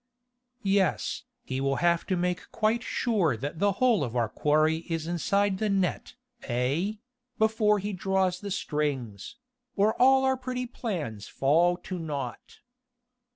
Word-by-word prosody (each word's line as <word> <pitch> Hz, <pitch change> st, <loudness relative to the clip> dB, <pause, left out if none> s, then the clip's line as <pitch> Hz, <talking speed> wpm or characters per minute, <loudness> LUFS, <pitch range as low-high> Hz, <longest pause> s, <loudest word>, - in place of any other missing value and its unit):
"Yes, 195 Hz, -3 st, +1 dB, 0.2 s
he 130 Hz, 0 st, -3 dB
will 135 Hz, 0 st, +1 dB
have 170 Hz, +1 st, +1 dB
to 190 Hz, -, +1 dB
make 180 Hz, 0 st, -2 dB
quite 225 Hz, +2 st, +1 dB
sure 195 Hz, -, 0 dB
that 145 Hz, +7 st, -5 dB
the 200 Hz, 0 st, +3 dB
whole 235 Hz, -, +3 dB
of 120 Hz, -2 st, -4 dB
our 115 Hz, -3 st, +1 dB
quarry 155 Hz, +5 st, +2 dB
is 165 Hz, -1 st, -2 dB
inside 190 Hz, +3 st, +1 dB
the 215 Hz, -, 0 dB
net, 190 Hz, -4 st, -1 dB, 0.3 s
eh?... 140 Hz, -, -1 dB, 0.4 s
before 220 Hz, -1 st, +3 dB
he 205 Hz, +1 st, -3 dB
draws 190 Hz, -1 st, 0 dB
the 205 Hz, -, -5 dB
strings... 145 Hz, -, -3 dB, 0.4 s
or 210 Hz, +2 st, +3 dB
all 265 Hz, +1 st, +6 dB
our 265 Hz, 0 st, +2 dB
pretty 250 Hz, 0 st, -3 dB
plans 170 Hz, -, -5 dB
fall 170 Hz, +6 st, +2 dB
to 180 Hz, 0 st, -6 dB
nought." 140 Hz, -7 st, -6 dB
180 Hz, 145 wpm, -28 LUFS, 150-210 Hz, 0.4 s, all